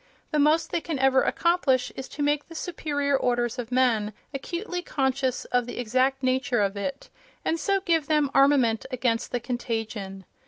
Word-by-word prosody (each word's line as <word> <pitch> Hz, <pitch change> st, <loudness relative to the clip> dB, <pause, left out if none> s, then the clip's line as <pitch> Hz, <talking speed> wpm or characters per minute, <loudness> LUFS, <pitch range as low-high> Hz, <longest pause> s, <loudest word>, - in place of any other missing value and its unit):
The 305 Hz, -, +1 dB
most 305 Hz, +3 st, +3 dB
they 335 Hz, -, 0 dB
can 320 Hz, -3 st, -3 dB
ever 265 Hz, 0 st, +4 dB
accomplish 325 Hz, -7 st, +1 dB
is 265 Hz, -, -6 dB
to 290 Hz, -, -4 dB
make 290 Hz, 0 st, +1 dB
the 330 Hz, -, -12 dB
superior 290 Hz, -5 st, -1 dB
orders 245 Hz, -1 st, 0 dB
of 240 Hz, 0 st, -5 dB
men 230 Hz, -5 st, +2 dB, 0.2 s
acutely 355 Hz, +6 st, -4 dB
conscious 265 Hz, -5 st, -1 dB
of 245 Hz, -1 st, 0 dB
the 245 Hz, -, -6 dB
exact 255 Hz, +3 st, +1 dB
nature 255 Hz, -2 st, +1 dB
of 200 Hz, 0 st, 0 dB
it, 275 Hz, -, -5 dB, 0.3 s
and 330 Hz, -, 0 dB
so 395 Hz, +5 st, +1 dB
give 330 Hz, -5 st, +1 dB
them 300 Hz, -3 st, +2 dB
armament 270 Hz, -5 st, +4 dB
against 245 Hz, -3 st, -1 dB
the 245 Hz, -, 0 dB
contagion. 225 Hz, -5 st, -4 dB
265 Hz, 170 wpm, -26 LUFS, 240-300 Hz, 0.3 s, ever